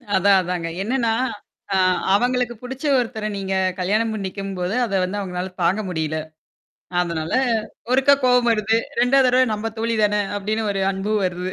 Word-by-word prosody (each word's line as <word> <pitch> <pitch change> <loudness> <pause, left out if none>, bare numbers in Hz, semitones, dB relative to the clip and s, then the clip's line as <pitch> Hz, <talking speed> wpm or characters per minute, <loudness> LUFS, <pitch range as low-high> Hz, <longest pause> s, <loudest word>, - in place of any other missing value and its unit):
அதான், 195 +1 +5
அதாங்க. 175 -2 -3
என்னன்னா, 235 +2 0 0.6
ஆ - - +3 0.4
அவங்களுக்கு 245 +1 +1
புடிச்ச 265 +3 -7 0.2
ஒருத்தர 225 -3 -3
நீங்க 195 -1 -2 0.2
கல்யாணம் 215 +5 +1
பண்ணிக்கும்போது, 195 -1 -4
அத 205 - -6
வந்து 200 +3 -2
அவங்களால 180 -1 -4
தாங்க 190 +6 +2
முடியல. 160 -2 -2 0.8
அதனால 165 -2 -2 0.6
ஒருக்கா 270 +2 +5
கோவம் 250 -1 +4
வருது. 220 0 +1 0.3
2ஆவது 260 +1 +4
தடவை 255 +1 +4
நம்ப 225 +2 -3
தோழி 230 +1 0
தான 210 0 +2 0.2
அப்படின்னு 215 +2 -2
ஒரு 195 -1 -1
அன்பு 195 +3 -3
வருது. 180 0 -2
205 Hz, 145 wpm, -21 LUFS, 185-240 Hz, 0.8 s, அதான்